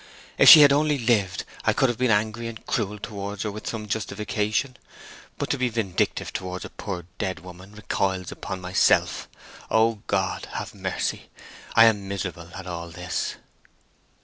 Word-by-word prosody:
If - - +9
she 155 - +12
had 140 -1 +8
only 150 0 +2
lived, 105 -8 +1 0.2
I - - +3
could 135 - +3
have 120 -2 -2
been 130 -1 +2
angry 110 +2 +1
and 115 -1 -9
cruel 105 -2 -1
towards 100 -1 -5
her 105 - -2
with 105 +2 -8
some 110 -2 -4
justification; 105 +4 -2 0.6
but - - -2
to - - -1
be 130 -1 +1
vindictive 110 -6 -1
towards 90 0 -5
a - - -9
poor 90 -4 -6
dead 95 -2 -3
woman 90 +2 -12
recoils 95 -3 -2
upon 95 - -6
myself. 90 0 +2 0.4
O 110 -1 +2
God, 95 -1 -1
have - - -5
mercy! - - -3 0.5
I 115 - +8
am 105 -3 +2
miserable 85 -3 -5
at 95 - -8
all 85 -1 -6
this!" 90 +1 -3
105 Hz, 165 wpm, -25 LUFS, 95-115 Hz, 0.6 s, she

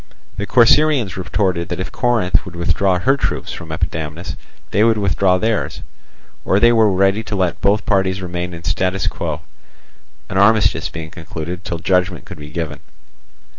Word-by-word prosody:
The 105 - -3
Corcyraeans 125 - +4
retorted 90 -2 -1
that 90 - -3
if 95 - -4
Corinth 120 -7 +1
would 90 -3 -10
withdraw 90 +2 +1
her 135 +9 +2
troops 140 - -2
from 80 - -8
Epidamnus 80 0 -4 0.4
they 105 - +3
would 115 -1 +4
withdraw 95 -2 +2
theirs, 110 +2 -1 0.6
or 95 - +2
they 120 +2 +5
were 110 -3 +4
ready 95 +3 +2
to 105 -1 -5
let 90 -4 -1
both 100 +3 +2
parties 95 -2 +1
remain 90 -1 -4
in 85 - -10
statu 95 +1 0
quo, 80 -2 -3 0.9
an 95 - -1
armistice 100 0 +3
being 80 0 -7
concluded 85 +1 -6
till 85 - -3
judgment 90 +1 0
could - - -10
be 75 0 -9
given. 75 -2 -4
95 Hz, 165 wpm, -19 LUFS, 85-105 Hz, 0.9 s, they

